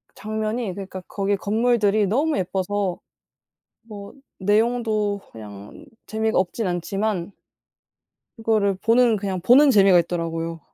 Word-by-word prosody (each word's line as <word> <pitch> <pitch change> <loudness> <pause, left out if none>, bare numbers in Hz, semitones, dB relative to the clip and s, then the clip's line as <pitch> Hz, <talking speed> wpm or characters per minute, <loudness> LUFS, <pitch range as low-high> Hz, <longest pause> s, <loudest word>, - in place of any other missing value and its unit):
장면이 215 -1 -3
그니까 190 -1 -8
거기 200 0 -1
건물들이 215 -1 +1
너무 290 +8 0
예뻐서 190 0 -2 0.8
뭐 205 -3 -11 0.2
내용도 215 0 0
그냥 105 -2 -11 0.2
재미가 220 0 -1
없진 190 +3 -1
않지만 190 +2 -2 1.0
그거를 215 -4 +1
보는 230 +2 +3
그냥 190 -2 -3
보는 270 +9 +6
재미가 195 -5 +5
있더라고요. 165 -1 -4
205 Hz, 270 characters per minute, -22 LUFS, 185-220 Hz, 1.0 s, 보는